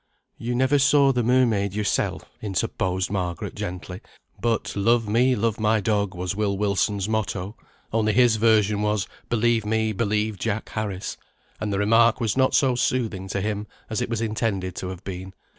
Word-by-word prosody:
"You 120 +1 -2
never 130 +3 +3
saw 140 0 +5
the 125 -2 +1
mermaid 115 -5 +2
yoursel," 105 -2 -1 0.2
interposed 95 -2 -1
Margaret, 90 -4 -3
gently. 90 +2 -6 0.4
But 115 -2 -1
"love 115 +2 +2
me, 125 +4 +3
love 115 0 -1
my 110 0 +2
dog," 100 -2 0
was 90 +2 -3
Will 100 -2 0
Wilson's 100 0 0
motto, 100 -2 -2 0.4
only 110 -1 +2
his 120 -1 +4
version 105 -2 +3
was 105 -2 0 0.2
"believe 120 -1 +2
me, 110 +1 0
believe 105 -1 -1
Jack 110 +4 -2
Harris;" 100 -3 -4 0.4
and 105 -1 -2
the 100 - 0
remark 115 +4 +4
was 115 -4 0
not 130 0 +3
so 135 -3 +4
soothing 115 -6 -1
to 100 0 -2
him 105 +1 -2 0.2
as 110 - -1
it - - -2
was 115 -1 -2
intended 105 -5 -2
to 90 - -4
have 95 0 -7
been. 95 0 -7
105 Hz, 170 wpm, -24 LUFS, 100-115 Hz, 0.4 s, saw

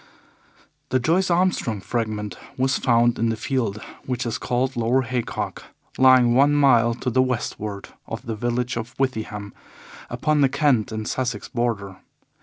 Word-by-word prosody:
The 130 - +2
Joyce 170 +9 +1
Armstrong 170 - +1
Fragment 105 0 -3 0.2
was 130 +1 +1
found 120 -1 +3
in 115 0 +2
the 115 - 0
field 115 -2 -2 0.3
which 125 -1 -2
is 115 - -2
called 130 +2 -1
Lower 120 +3 +2
Haycock, 125 0 -4 0.3
lying 130 -2 +6
one 140 +3 +4
mile 120 -5 +4
to 125 +1 -3
the 130 - +3
westward 105 -5 -3 0.2
of - - -6
the 115 - -3
village 120 +2 -2
of 115 +2 -6
Withyham, 110 -6 -3 0.6
upon 155 -1 +1
the 135 - +5
Kent 130 -7 +2
and 110 0 -4
Sussex 125 -5 -3
border. 105 -6 -2
120 Hz, 150 wpm, -23 LUFS, 115-130 Hz, 0.6 s, lying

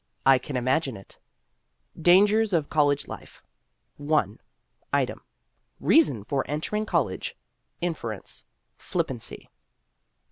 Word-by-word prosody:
I 135 -1 +6
can 130 +1 -4
imagine 130 0 0
it: 95 - -15 0.8
DANGERS 205 +5 +5
OF 155 -4 +1
COLLEGE 145 -2 +2
LIFE - - -10 0.6
I. 150 +1 +1 0.6
Item: - - 0 0.6
Reason 135 - +4
for 135 +5 -1
entering 210 +9 -2
college. 145 - -1 0.4
Inference: 135 - -3 0.3
Flippancy. - - -4
150 Hz, 95 wpm, -26 LUFS, 130-175 Hz, 0.8 s, I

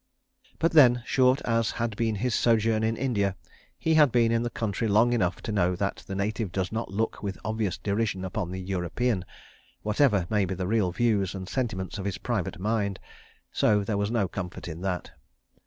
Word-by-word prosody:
But 165 - +2
then, 125 -6 +6
short 130 +1 +3
as 115 -2 +1
had 115 -2 -1
been 110 0 0
his 120 +3 -1
sojourn 115 -1 +2
in 110 0 0
India, 100 -7 0 0.4
he 160 - +1
had 150 -4 +6
been 115 -1 +3
in 115 0 +2
the 120 - -1
country 110 -1 -2
long 110 +4 +4
enough 95 -6 0
to - - -3
know 90 -3 +2
that 100 +2 -2
the 95 - -4
native 105 0 -2
does 95 0 -2
not 115 +1 -3
look 110 +3 -2
with 100 -2 -4
obvious 110 -4 -1
derision 100 -2 -1
upon 90 -1 -3
the 95 +1 -5
European, 95 +3 -1 0.6
whatever 105 -3 +2
may 105 -1 +1
be 95 +1 -3
the 90 +1 -3
real 100 -2 +1
views 100 -2 +1
and 95 -1 -6
sentiments 105 -6 -3
of 95 - -5
his 100 -2 -2
private 105 -7 -2
mind—so 105 0 -1
there 105 +1 -2
was 100 0 0
no 110 -4 +1
comfort 90 0 -6
in 80 0 -7
that. 90 -2 -3
105 Hz, 190 wpm, -27 LUFS, 95-115 Hz, 0.6 s, then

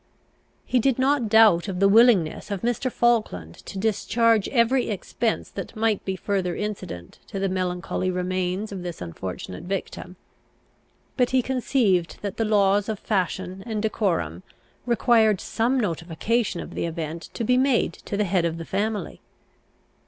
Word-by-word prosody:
He 255 - +2
did 260 +1 +2
not 265 -3 +2
doubt 215 -5 +6
of 185 -2 -3
the 195 - +5
willingness 210 -7 +4
of 200 -3 -4
Mr. 245 +2 0
Falkland 215 - 0
to - - -7
discharge 225 +1 +2
every 245 +1 +2
expense 220 +2 -2
that 195 +3 -7
might 220 -2 0
be 190 - -2
further 185 -2 -1
incident 195 - -6
to 200 - -6
the 195 0 0
melancholy 185 0 -2
remains 185 +2 -2
of 195 -2 -5
this 175 -2 -6
unfortunate 90 - -6
victim; 185 -1 -5 1.0
but 250 -2 +3
he 255 -1 +2
conceived 230 - +1
that 200 -2 -4
the 225 - +1
laws 205 -1 +3
of 215 - -2
fashion 190 -2 -2
and 220 -2 -2
decorum 170 - -1 0.5
required 225 -4 +3
some 245 +4 0
notification 185 +2 -1
of - - -9
the - - -2
event 165 0 -5
to 235 - -2
be 250 +3 +3
made 255 -8 +2
to 200 - -6
the 210 - +2
head 185 -2 +1
of 165 -1 -1
the 165 - -6
family. 210 +4 -3
200 Hz, 155 wpm, -24 LUFS, 180-230 Hz, 1.0 s, doubt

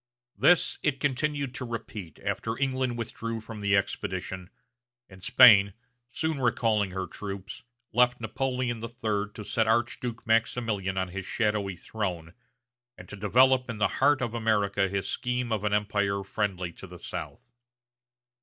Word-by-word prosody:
This 180 - +4
it 140 -3 0
continued 140 -1 -1
to 130 - -5
repeat 115 -7 -6
after 115 0 -2
England 130 -3 0
withdrew 115 0 -4
from 110 -1 -9
the 100 -1 +3
expedition, 95 -1 -3 0.6
and 95 -1 -15
Spain, 110 -6 +7 0.4
soon 160 0 -1
recalling 115 -4 +2
her 95 0 -3
troops, 100 +1 -7 0.3
left 125 0 +4
Napoleon 120 +1 -2
III 110 -3 -2
to 105 - -7
set 110 +2 +1
the - - -1
Archduke 120 +1 -1
Maximilian 110 -4 0
on 95 -1 -1
his 95 +2 -6
shadowy 105 -4 0
throne, 90 -3 -4 0.6
and - - -11
to - - -7
develop 125 +6 +4
in 115 - -4
the 105 -3 +3
heart 140 -1 +4
of 120 -1 -2
America 105 -4 +1
his 100 0 -2
scheme 125 -1 -2
of 105 -2 0
an 105 - 0
empire 100 -1 0
friendly 95 -3 -2
to - - -11
the - - -11
South. 120 - -7
110 Hz, 150 wpm, -28 LUFS, 100-125 Hz, 0.6 s, Spain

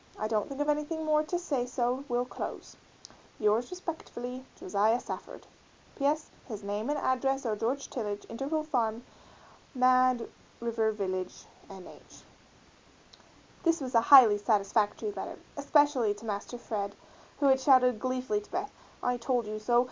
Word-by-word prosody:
I 215 - -2
don't 215 -1 -1
think 275 0 -7
of 290 - 0
anything 300 +2 -1
more 305 0 +3
to 350 - -1
say 280 -8 -2
so 250 +1 -1
will 245 0 +1
close. - - -7 0.6
Yours 220 +3 +2
respt. 360 -3 -7 0.4
JOSIAH 210 +5 +2
SAFFORD. - - -8 0.5
P. 280 - -2
S. 305 +2 -1 0.2
His 215 -5 -7
name 205 +5 -3
and 295 - 0
address 270 +1 0
are 220 -2 0
George 250 +6 -2
Tillage, 205 -4 -4
Intervale 280 +7 -2
Farm, 235 -6 -1 0.7
Mad 255 -1 +4 0.3
River 225 -2 0
Village, 185 -3 -4 0.2
N. 190 -2 -10
H. - - -15 1.4
This 330 -1 +2
was 260 -2 -5
a 230 - +6
highly 235 -5 +8
satisfactory 210 - +1
letter, - - -6 0.2
especially 285 -6 +3
to 210 +3 -12
Master 210 +3 -4
Fred 205 -4 -4 0.4
who 285 - +1
had 265 0 +5
shouted 255 -4 +5
gleefully 255 -4 -1
to 210 - -17
Beth, 395 +3 -3 0.3
"I 245 0 +1
told 245 -1 0
you 215 0 -5
so!" 240 +3 +3
245 Hz, 155 wpm, -30 LUFS, 215-275 Hz, 1.4 s, highly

